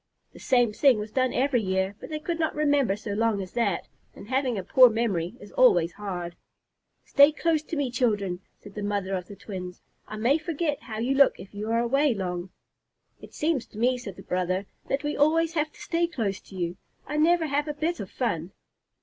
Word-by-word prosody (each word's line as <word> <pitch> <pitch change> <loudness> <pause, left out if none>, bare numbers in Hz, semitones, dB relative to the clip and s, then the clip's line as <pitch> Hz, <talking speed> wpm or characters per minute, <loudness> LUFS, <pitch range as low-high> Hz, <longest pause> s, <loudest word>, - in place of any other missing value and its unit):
The - - -13
same 245 -4 +2
thing 265 +1 +4
was 210 0 -5
done 255 +2 +1
every 260 -2 +1
year, 190 0 -1
but - - -9
they 310 - -3
could 330 +2 -3
not 320 -1 0
remember 285 -8 +2
so 210 0 -6
long 220 0 +1
as 185 -2 -6
that, 230 -6 -1 0.3
and 205 - -12
having 260 -3 0
a 190 - -3
poor 255 +6 +7
memory 215 -5 -1
is 205 - -12
always 175 -10 +4
hard. 180 -4 -5 0.7
"Stay 280 +2 +6
close 315 0 +1
to 315 - -6
me, 280 -4 -1
children," 205 -7 0 0.2
said 205 - -13
the 210 - -5
mother 200 -2 -2
of 180 -2 -3
the 205 - -10
twins. 180 -3 -8 0.2
"I 215 - -7
may 250 +8 +2
forget 315 -3 -2
how 220 -3 -7
you 240 +5 0
look 275 0 +4
if 190 - -11
you 210 +2 -5
are 230 - +2
away 275 +2 +2
long." 180 -2 -4 0.7
"It - - -13
seems 305 -5 0
to - - -14
me," 250 +3 +2
said 200 -6 -8
the - - -12
brother, 185 +2 -1 0.2
"that 275 +2 -1
we 295 0 -1
always 325 +3 +3
have 310 -1 0
to - - -19
stay 340 0 0
close 210 - -2
to 195 - -15
you. 175 -1 -3 0.3
I 300 - -3
never 330 +2 +4
have 290 0 0
a 300 - -2
bit 325 +3 -1
of - - -6
fun!" - - -2
235 Hz, 220 wpm, -26 LUFS, 200-290 Hz, 0.7 s, poor